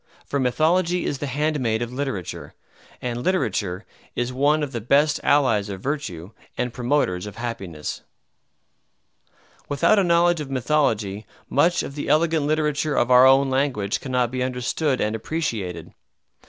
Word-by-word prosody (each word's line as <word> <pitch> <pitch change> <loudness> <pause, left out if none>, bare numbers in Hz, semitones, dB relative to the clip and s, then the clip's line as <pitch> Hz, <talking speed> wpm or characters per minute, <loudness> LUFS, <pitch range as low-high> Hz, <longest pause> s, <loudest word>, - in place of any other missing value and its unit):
For 140 - -2
Mythology 165 +8 +1
is 140 - -2
the 145 - -3
handmaid 135 -5 0
of 120 +1 -7
literature; 130 - -5 0.5
and 120 -1 -3
literature 105 - -1 0.3
is 120 +1 -2
one 145 +4 +2
of 145 - -3
the 120 -3 -4
best 140 +6 +3
allies 120 -8 +2
of 95 -1 -5
virtue 100 - -4 0.3
and 125 -1 -2
promoters 120 -7 0
of 105 - -9
happiness. 100 -10 -5 1.7
Without 145 +9 +3
a - - +3
knowledge 170 -1 +3
of 145 - -6
mythology 115 -7 0 0.2
much 170 +5 +3
of - - -6
the 145 - -5
elegant 155 0 +2
literature 150 -1 0
of 120 - +1
our 125 +1 +8
own 135 0 +4
language 125 -6 0
cannot 125 -3 -1
be 130 0 -3
understood 130 +3 -1
and 105 +1 0
appreciated. 110 - -4
130 Hz, 145 wpm, -23 LUFS, 115-150 Hz, 1.7 s, our